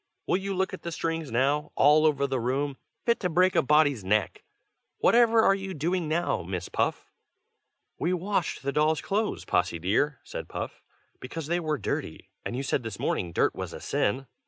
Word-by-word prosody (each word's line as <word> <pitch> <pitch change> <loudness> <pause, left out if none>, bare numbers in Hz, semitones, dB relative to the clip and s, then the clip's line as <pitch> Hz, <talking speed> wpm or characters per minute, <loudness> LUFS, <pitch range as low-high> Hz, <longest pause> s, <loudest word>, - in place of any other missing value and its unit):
will - - +2
you 195 0 -3
look 190 +1 0
at 185 - -6
the 170 - -5
strings 165 -1 -2
now, 140 +5 +1
all 150 +3 +5
over 140 -2 +1
the 135 -2 -1
room, 135 +4 -1 0.3
fit 235 -1 +2
to 180 - -1
break 180 +3 +3
a - - +5
body's 145 -5 +3
neck! 105 +3 0 0.5
Whatever 230 -1 +5
are 195 - +5
you 195 -1 -4
doing 170 +3 -1
now, 165 +3 0
Miss 90 +1 -5
Puff?" - - -1 0.9
"We 170 - 0
washed 185 -3 -1
the 140 - -1
dolls' 155 +2 +2
clothes, 210 +2 -1
Possy 85 - +1
dear," 110 - 0
said - - -7
Puff, - - -6 0.4
"because 155 +5 -6
they 170 +3 0
were 155 -3 -1
dirty, - - -4
and - - -4
you 135 - -2
said 135 - 0
this 115 -4 -6
morning 85 - -1
dirt - - +2
was - - -6
a - - -7
sin." 130 +7 -1
150 Hz, 190 wpm, -27 LUFS, 135-180 Hz, 0.9 s, all